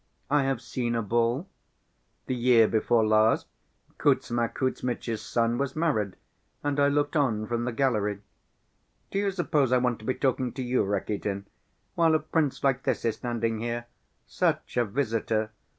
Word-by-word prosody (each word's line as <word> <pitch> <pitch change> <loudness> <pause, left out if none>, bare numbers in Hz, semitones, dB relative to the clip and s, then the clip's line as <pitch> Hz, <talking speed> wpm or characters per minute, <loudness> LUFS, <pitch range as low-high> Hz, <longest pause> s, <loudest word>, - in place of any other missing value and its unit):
"I 145 -2 +3
have 135 -3 -1
seen 120 -2 -2
a 115 - 0
ball. 120 - +1 0.8
The - - -2
year 120 -2 +5
before 110 +1 +2
last, 110 +1 +3 0.5
Kuzma 120 -1 +2
Kuzmitch's 120 -2 -2
son 115 0 0
was 140 -1 -2
married 140 - 0 0.5
and 145 0 0
I 140 - +5
looked 145 +2 0
on 115 -8 +1
from 120 +1 -2
the 125 - -1
gallery. 105 -6 0 0.9
Do 195 - 0
you 200 0 +1
suppose 155 -8 +1
I 130 - +5
want 125 -2 0
to 110 - -12
be 130 - 0
talking 130 -2 0
to 130 - -4
you, 125 -2 +1
Rakitin, 100 0 -2 0.5
while 165 -2 +3
a - - +3
prince 155 -2 -1
like 135 -1 +2
this - - -1
is 115 -2 0
standing 115 -2 -2
here. 120 +1 -3 0.4
Such - - -1
a 120 -1 +3
visitor! 110 -2 -1
120 Hz, 165 wpm, -27 LUFS, 110-135 Hz, 0.9 s, year